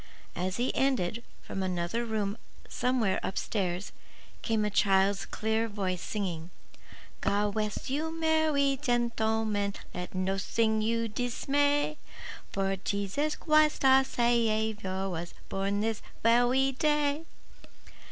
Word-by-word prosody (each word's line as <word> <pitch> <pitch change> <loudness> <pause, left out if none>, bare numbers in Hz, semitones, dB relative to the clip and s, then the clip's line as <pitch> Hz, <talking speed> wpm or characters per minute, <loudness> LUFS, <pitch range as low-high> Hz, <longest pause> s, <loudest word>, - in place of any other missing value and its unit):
As 185 +2 -2
he 245 +2 0
ended, 235 -6 +1 0.2
from 195 - -4
another 185 +4 -1
room 210 -3 -1 0.3
somewhere 245 -6 +1
up 190 - -4
stairs, 185 -3 -2 0.5
came 220 -2 +1
a 210 - -1
child's 195 0 +3
clear 220 +1 0
voice 190 -4 -2
singing, 175 -6 -3 0.7
God 205 0 +1
west 210 -1 -2
you, 310 +4 -1
mer 315 -1 +2
wy 280 -1 +2
gentle 235 -4 +1
men, 205 -2 -1 0.2
Let 180 +1 -6
nossing 200 +4 +1
you 230 +1 0
dismay; 285 +6 0 0.5
For 195 0 0
Jesus 200 +11 -1
Chwist 305 -2 +3
our 265 0 +7
Sa 245 -2 -2
wiour 220 -5 +1
Was 170 0 -5
born 195 +1 -1
this 220 0 -1 0.2
ve 230 +2 +5
wy 265 +2 +3
day. 295 +2 +1
220 Hz, 125 wpm, -29 LUFS, 195-265 Hz, 0.7 s, our